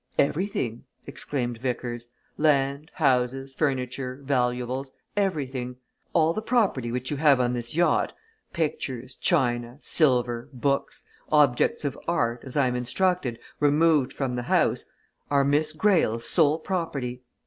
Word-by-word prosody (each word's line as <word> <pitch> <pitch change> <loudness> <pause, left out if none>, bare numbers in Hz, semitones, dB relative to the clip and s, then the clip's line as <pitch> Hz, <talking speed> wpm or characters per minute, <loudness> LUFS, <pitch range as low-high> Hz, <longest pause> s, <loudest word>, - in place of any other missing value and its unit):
"Everything!" 140 - 0 0.2
exclaimed 120 -5 -3
Vickers. 120 -1 -3 0.3
"Land, 140 0 +1
houses, 135 -3 +1
furniture, 130 -2 -2
valuables 125 0 -1 0.2
everything. 135 -11 -1 0.4
All 165 -1 +3
the 215 - -3
property 205 - +1
which 125 +2 -3
you 145 - -1
have 145 -3 +5
on 125 -1 +1
this 120 +2 -4
yacht 175 +1 +2 0.4
pictures, 130 -6 -3
china, 120 -7 +1
silver, 125 -7 +2
books, 140 +2 -1 0.3
objects 150 - +3
of 140 - -3
art, 120 -8 0
as 130 +1 -6
I 140 - +4
am 125 - -1
instructed, 130 +1 0 0.2
removed 150 -1 +3
from 130 -3 -2
the 120 - -2
house - - +2 0.4
are 140 -1 +3
Miss 150 +2 +2
Greyle's 155 - +2
sole 155 -3 +4
property. 150 -9 -3
135 Hz, 125 wpm, -26 LUFS, 125-155 Hz, 0.4 s, have